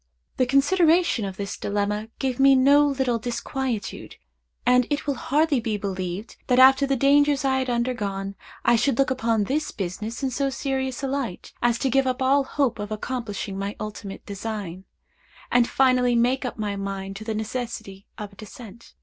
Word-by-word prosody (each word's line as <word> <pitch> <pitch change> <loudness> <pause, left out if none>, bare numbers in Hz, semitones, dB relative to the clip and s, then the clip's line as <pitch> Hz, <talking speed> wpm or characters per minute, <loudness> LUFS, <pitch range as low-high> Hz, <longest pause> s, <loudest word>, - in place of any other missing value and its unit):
The 255 - +2
consideration 315 - +3
of 190 -1 -6
this 200 -1 -4
dilemma 210 +1 -2
gave 260 -2 -2
me 275 0 +7
no 285 +3 +5
little 265 -4 0
disquietude; 245 -1 -4 0.5
and 250 -1 +4
it 290 - -1
will 285 - 0
hardly 290 +2 +1
be 225 -2 -2
believed, 190 +1 -5
that, 250 - +3
after 265 +2 +7
the 275 - +1
dangers 280 +1 +3
I 265 -1 +2
had 260 -1 -2
undergone, 210 -5 -2 0.3
I 235 - +5
should 240 +1 +1
look 275 -1 +2
upon 230 -4 +1
this 300 +8 -1
business 210 +7 -5
in 265 - 0
so 275 +2 0
serious 265 0 -3
a - - 0
light, 265 -8 -4
as 240 -1 +2
to 265 - 0
give 270 +1 +3
up 255 0 -1
all 270 +2 +3
hope 265 -5 0
of 205 +1 -5
accomplishing 215 -3 -4
my 200 +1 -3
ultimate 210 -1 -7
design, 200 -3 -6 0.7
and 245 -1 +4
finally 255 -2 +3
make 250 +3 +2
up 250 - -4
my 210 -2 -2
mind 195 0 -5
to 215 - -8
the 220 0 -3
necessity 215 -3 -5
of 210 -2 -7
a - - -17
descent. 220 +2 -12
240 Hz, 180 wpm, -24 LUFS, 210-270 Hz, 0.7 s, me